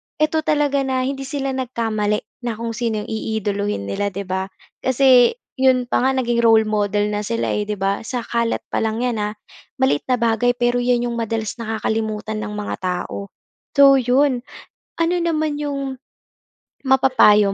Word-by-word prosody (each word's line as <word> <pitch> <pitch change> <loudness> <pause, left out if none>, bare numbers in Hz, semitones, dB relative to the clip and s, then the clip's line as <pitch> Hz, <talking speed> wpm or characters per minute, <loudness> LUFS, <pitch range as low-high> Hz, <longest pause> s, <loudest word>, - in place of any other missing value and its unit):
'eto 310 +1 +1
talaga 290 -2 +2
na 260 -1 0
hindi 270 +1 -3
sila 275 0 -2
nagkamali 225 -5 -1 0.2
na 230 - -2
kung 230 +1 -4
sino 225 -2 -2
yung - - -9
iidolohin 205 - -2
nila, 100 - -2
'di 200 0 -4
ba? 190 0 -3 0.3
Kasi 260 - +5 0.2
yun 260 -1 +3
pa 245 - 0
nga 265 +1 +2
naging 240 -2 +1
role 225 -1 +5
model 210 0 0
na 205 - -1
sila, 230 +2 -1
eh, - - 0
'di 210 - -2
ba? 195 +1 -1
Sa 240 +1 -4
kalat 235 0 -1
pa - - +1
lang 225 +2 -1
yan, 235 -4 -1
ah, 210 +1 -3 0.4
maliit 265 - +2
na 250 - +3
bagay, 235 +1 +1
pero 245 0 +1
yun 245 0 +1
yung 240 - -2
madalas 225 -2 -2
nakakalimutan 220 -1 -2
ng - - -4
mga 210 - -3
tao, 185 +2 -3 0.5
so 280 -1 +8
yun. 255 +1 +2 0.6
Ano 335 +1 +2
naman 315 -3 0
yung 275 -2 -3 0.9
mapapayo 255 -7 +5
235 Hz, 170 wpm, -20 LUFS, 210-265 Hz, 0.9 s, so